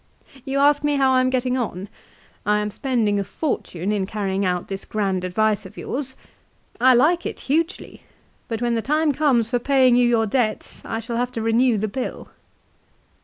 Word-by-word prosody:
" 265 -2 -21
You 270 0 -2
ask 290 +1 +4
me 295 0 +1
how 270 -1 +3
I 255 - +4
am 255 - +2
getting 255 0 0
on. 200 -5 -4 0.6
I 210 +1 +2
am 210 0 -2
spending 220 -3 0
a - - 0
fortune 195 - -3
in 200 -3 -1
carrying 195 -2 -2
out 180 -2 -1
this 195 0 -5
grand 195 -4 -2
advice 210 +3 +1
of 190 - -13
yours. 265 -1 -4 0.6
I 255 +1 +6
like 330 +8 +3
it - - -7
hugely; 325 +6 -2 0.5
but 230 -1 -3
when 240 -1 +1
the 230 - 0
time 305 +4 +1
comes 255 -6 +1
for 245 - +2
paying 260 -1 +4
you 245 0 +4
your 225 -2 +2
debts 220 0 -2
I 225 0 -3
shall 230 +1 -4
have 245 +1 -1
to 225 - -3
renew 230 +1 +3
the 215 +2 -1
bill." 255 +5 -5
240 Hz, 195 wpm, -22 LUFS, 210-265 Hz, 0.6 s, I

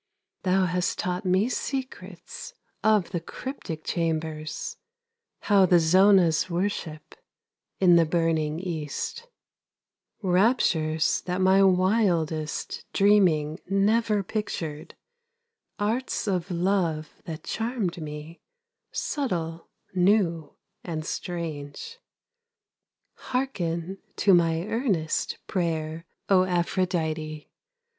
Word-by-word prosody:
Thou 185 0 +2
hast 180 0 -1
taught 180 +2 -2
me 185 +4 +3
secrets 255 - -5 0.3
Of 215 -4 +3
the 175 - -1
cryptic 165 - -7
chambers, 160 -2 -3 0.6
How 200 -3 +4
the 180 - +6
zonahs 185 0 +5
worship 170 -3 -3 0.7
In 175 -2 +6
the 165 - +5
burning 160 -2 0
East; 175 - -4 1.0
Raptures 180 -5 +2
that 180 +1 -1
my 190 +1 +5
wildest 180 -5 +1
Dreaming 175 -7 +3
never 210 +1 +2
pictured, 170 -7 -4 0.8
Arts 225 +3 -1
of 185 -2 -1
love 170 -4 -1
that 160 -2 -6
charmed 225 -7 -2
me, 150 +2 -8 0.5
Subtle, 170 - -3 0.2
new 180 -4 +2 0.3
and 155 -3 -4
strange. 170 - -5 1.3
Hearken 190 -8 -2 0.2
to 195 - +4
my 165 -1 +3
earnest 205 - -1
Prayer, 165 -2 -2 0.2
O 190 -2 +5
Aphrodite! 165 -4 -1
180 Hz, 90 wpm, -26 LUFS, 160-200 Hz, 1.3 s, the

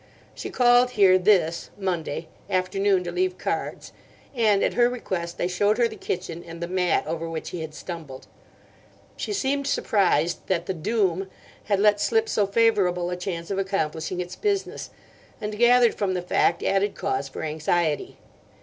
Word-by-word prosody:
She - - -6
called 245 0 +4
here 185 -2 +6
this 180 -4 +2
(Monday) 175 -5 -3 0.2
afternoon 185 +1 +1
to 175 - -4
leave 185 +1 -1
cards; - - -4 0.4
and, 215 -5 +3
at - - +1
her 240 0 +4
request, 180 -8 -4
I - - +1
showed 205 +4 +1
her 240 -1 +3
the 220 - -9
kitchen 170 -4 -4
and 165 0 -10
the 170 - -3
mat 180 -1 +1
over 165 +1 -3
which 160 -1 -5
he 175 - -5
had 155 -1 -7
stumbled. 155 -8 -8 0.9
She - - -4
seemed 280 -7 -1
surprised 180 - +1
that 175 -2 0
the 190 - -2
'Doom' 190 0 0 0.4
had 200 -2 +1
let 205 0 +4
slip 445 0 +2
so 210 - +1
favourable 195 -5 +2
a - - -1
chance 180 -1 -5
of 195 - -1
accomplishing 180 -3 -2
its 180 0 -5
business, 405 -2 -2 0.5
and 210 0 -4
gathered 240 -1 +5
from 190 -2 -1
the 180 - -2
fact 180 - +1
added 195 +1 +1
cause 135 +1 -2
for - - -7
anxiety. 155 0 -1
185 Hz, 165 wpm, -25 LUFS, 170-210 Hz, 0.9 s, here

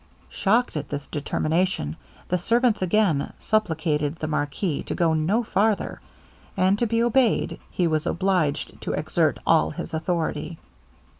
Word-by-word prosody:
Shocked 230 +3 +1
at 150 -2 -4
this 145 -1 -4
determination, 155 - -1 0.3
the 180 - 0
servants 235 +4 +2
again 185 -5 +1
supplicated 160 -8 0
the 155 - -5
marquis 150 +2 -1
to - - -4
go 165 -2 +2
no 175 +10 +1
farther; 210 0 0 0.6
and 190 +2 +3
to 235 - +2
be 230 +1 +1
obeyed, 240 -1 +2
he 180 - 0
was 155 -2 0
obliged 180 -5 0
to - - -3
exert - - +1
all 75 - +4
his 165 - -7
authority. 160 -1 -2
175 Hz, 140 wpm, -24 LUFS, 155-210 Hz, 0.6 s, all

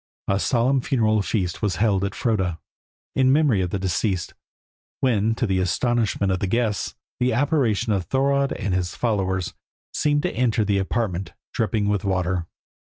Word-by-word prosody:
A 100 0 +1
solemn 130 +4 +2
funeral 110 -6 +2
feast 95 -4 -2
was 100 -4 0
held 100 -3 +2
at 100 0 -2
Froda, 95 -8 0 0.6
in 130 -1 +4
memory 140 -9 +3
of 90 - -1
the 100 - -2
deceased, 95 0 -1 0.7
when, 115 -3 +2
to 120 - 0
the 95 -3 +1
astonishment 105 +1 +1
of 95 - 0
the 100 - -1
guests, 110 0 -1 0.2
the 125 0 +2
apparition 125 -5 +1
of 95 -3 -1
Thorodd 140 +1 +2
and 100 - -2
his 90 -1 -1
followers 95 -6 -1 0.4
seemed 145 -1 +1
to 180 - -1
enter 115 -3 +2
the 100 -1 +1
apartment 95 -4 -2 0.2
dripping 110 -2 0
with 105 -2 0
water. 90 -3 0
105 Hz, 165 wpm, -23 LUFS, 95-120 Hz, 0.7 s, in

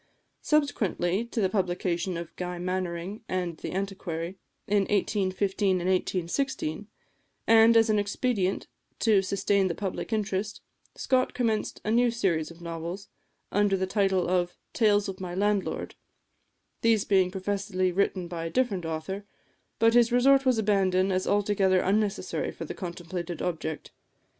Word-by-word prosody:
Subsequently 220 - +1
to 235 - -4
the 190 - +3
publication 180 -2 -1
of 170 -1 -7
"Guy 180 0 -4
Mannering" 180 +2 -3
and 180 -3 -2
"The - - -6
Antiquary," 185 -2 -4 0.3
in 205 0 +2
1815 195 -1 +1
and 175 - -3
1816, 185 - -1 0.6
and 225 +1 +6
as 225 0 +5
an 215 -1 +2
expedient 205 -1 -1 0.3
to 215 -4 +4
sustain 195 0 +1
the 170 - -2
public 195 +3 -4
interest, 210 -1 -2 0.3
Scott 255 -1 +1
commenced 225 -4 -1
a 215 - 0
new 240 +2 +4
series 180 -9 0
of 170 0 -14
novels, 170 +4 -6 0.4
under 205 -1 +2
the 190 - 0
title 190 -2 +1
of 175 -1 0 0.2
"Tales 210 -3 +3
of 190 -1 -6
my 180 -1 -5
Landlord," 205 0 -1 0.9
these 225 -3 +3
being 190 -2 +3
professedly 190 -1 -1
written 185 -1 0
by 165 -1 -5
a - - -2
different 205 -6 0
author; 165 +5 -4 0.5
but 230 0 +4
this 240 0 +5
resort 270 +2 +4
was 255 -3 +4
abandoned 195 -3 +2
as 185 0 -1
altogether 200 -2 +2
unnecessary 205 +2 0
for - - -7
the - - -5
contemplated 175 -1 -5
object. 160 -3 -4
195 Hz, 145 wpm, -27 LUFS, 180-210 Hz, 0.9 s, and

